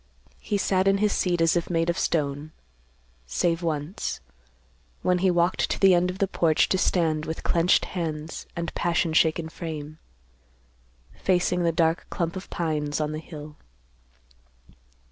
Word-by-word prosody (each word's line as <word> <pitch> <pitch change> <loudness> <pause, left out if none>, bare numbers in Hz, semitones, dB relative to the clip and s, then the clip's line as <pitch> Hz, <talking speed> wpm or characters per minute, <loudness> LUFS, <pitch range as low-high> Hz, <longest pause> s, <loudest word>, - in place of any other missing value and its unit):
He 205 - -1
sat 190 -1 +1
in 195 0 +4
his 210 0 +2
seat 175 -2 0
as 165 +1 +4
if 170 - -1
made 165 -1 +1
of 170 - +1
stone; 150 -1 -1 0.7
save 165 - 0
once, 160 +1 -3 0.8
when 180 0 +2
he 190 +1 +3
walked 175 +1 +1
to - - -2
the 195 -1 +6
end 175 +1 +3
of 180 - -5
the 195 - +1
porch 165 -4 +2
to 190 - +2
stand 160 -5 +1
with 160 - -5
clenched 170 +1 +3
hands 160 -3 -5
and 170 0 -4
passion 170 -1 0
shaken 160 0 +2
frame, 155 -2 -7 1.1
facing 180 -1 +1
the 170 -1 +2
dark 165 +1 +1
clump 170 -1 -2
of 185 - -7
pines 150 -3 -2
on 150 -1 -1
the 155 - -4
hill. 150 -2 -10
170 Hz, 155 wpm, -25 LUFS, 155-180 Hz, 1.1 s, the